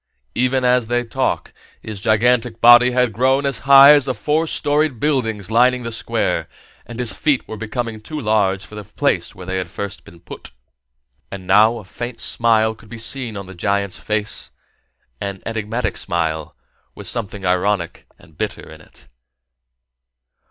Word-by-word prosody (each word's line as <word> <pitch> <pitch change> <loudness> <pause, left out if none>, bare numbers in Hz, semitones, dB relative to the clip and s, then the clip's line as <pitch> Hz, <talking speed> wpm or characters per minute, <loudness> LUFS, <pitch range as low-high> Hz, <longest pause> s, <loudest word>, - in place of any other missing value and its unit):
Even 130 +1 +1
as 125 -2 +3
they 120 +1 0
talked, 115 - -2 0.3
his 110 -2 -7
gigantic 115 +2 +1
body 120 +1 +7
had 125 -2 +1
grown 130 +5 +2
as 135 -3 0
high 140 +1 +10
as 145 -3 +3
the 130 -2 -1
four 150 +10 0
storied 145 -4 0
buildings 115 -9 -1
lining 125 +2 +3
the 115 - -4
Square, 115 - -2 0.4
and 120 0 -9
his 125 -3 -2
feet 145 -4 0
were - - -6
becoming 110 0 -5
too 150 +8 -6
large 100 -5 +1
for 105 - -16
the 105 0 -7
place 105 -3 -1
where 95 -2 -10
they 95 +1 -3
had 90 -2 -5
first 100 +3 -6
been 85 - -16
put. 85 - -11 0.8
And 95 -2 -8
now 105 +5 +4
a 110 - -10
faint 120 +4 -7
smile 110 -1 +2
could 110 -1 -18
be 115 - -8
seen 115 -1 -3
on 100 - -6
the 95 - -11
giant's 100 +1 -2
face, 105 -1 -2 0.7
an 100 -1 -5
enigmatic 115 +2 -3
smile, 80 -3 -3 0.4
with - - -10
something 105 -4 -5
ironic 90 -1 -1
and 80 -1 -21
bitter - - -4
in - - -13
it. - - -16
110 Hz, 165 wpm, -19 LUFS, 100-125 Hz, 0.8 s, high